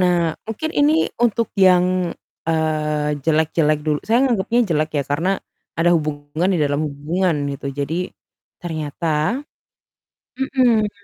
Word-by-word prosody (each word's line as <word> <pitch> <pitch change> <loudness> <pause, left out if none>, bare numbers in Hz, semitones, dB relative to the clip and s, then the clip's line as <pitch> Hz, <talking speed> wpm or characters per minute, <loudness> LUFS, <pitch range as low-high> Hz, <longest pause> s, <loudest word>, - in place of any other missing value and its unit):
Nah, 180 -1 +3 0.3
mungkin 225 +9 -3
ini 290 +2 +5 0.3
untuk 230 -1 +1 0.2
yang, 180 -1 +6 0.7
eee, 150 -2 0
jelek-jelek 155 -1 +2
dul 150 -1 +2
saya 230 +2 +3
nganggepnya 235 0 +1
jelek, 155 +1 +1
ya, - - +1
karena 160 +6 0 0.5
ada 175 +1 +4
hubungan 150 +2 -1
di - - +1
dalam 145 0 0
hubungan, 160 +5 -1 0.2
gitu. 140 - -7
Jadi, 140 +3 -1 0.7
ternyata 160 -1 -4 1.3
mhm. 250 -5 +2
160 Hz, 120 wpm, -20 LUFS, 150-205 Hz, 1.3 s, yang